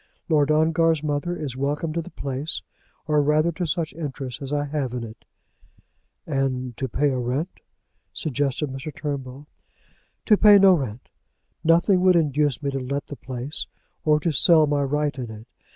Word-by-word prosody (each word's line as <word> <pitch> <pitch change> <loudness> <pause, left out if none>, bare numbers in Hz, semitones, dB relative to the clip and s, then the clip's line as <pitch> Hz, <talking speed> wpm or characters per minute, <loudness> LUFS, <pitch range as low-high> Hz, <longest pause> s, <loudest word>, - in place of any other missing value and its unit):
Lord 150 -2 +3
Ongar's 160 0 +2
mother 155 +4 -2
is 140 -5 -5
welcome 145 +4 -2
to 170 - -1
the 165 - -10
place, 140 0 -4 0.4
or 150 -1 +2
rather 155 +3 +2
to 175 +1 -3
such 160 -1 -2
interest 135 -4 -6
as 135 0 -5
I 145 0 0
have 140 -4 -3
in 120 - -3
it." 110 -1 -11 1.0
"And 130 -4 -2
to 130 - -3
pay 145 +5 +1
a 130 - -1
rent?" 130 +9 -3 0.5
suggested 145 -1 -2
Mr. 135 +3 -6
Turnbull. 140 -2 -5 0.8
"To 210 - +5
pay 205 -1 +8
no 195 -1 +7
rent! 130 -8 -3 0.6
Nothing 175 +3 +4
would 185 -1 +5
induce 145 -3 +1
me 140 - -1
to 135 - -2
let 140 +3 -3
the 145 - -8
place, 130 +2 -5 0.4
or 150 -1 +3
to 165 - +1
sell 160 +1 +5
my 145 -1 0
right 145 +1 0
in 120 -3 -5
it. 110 0 -10
145 Hz, 170 wpm, -24 LUFS, 135-160 Hz, 1.0 s, pay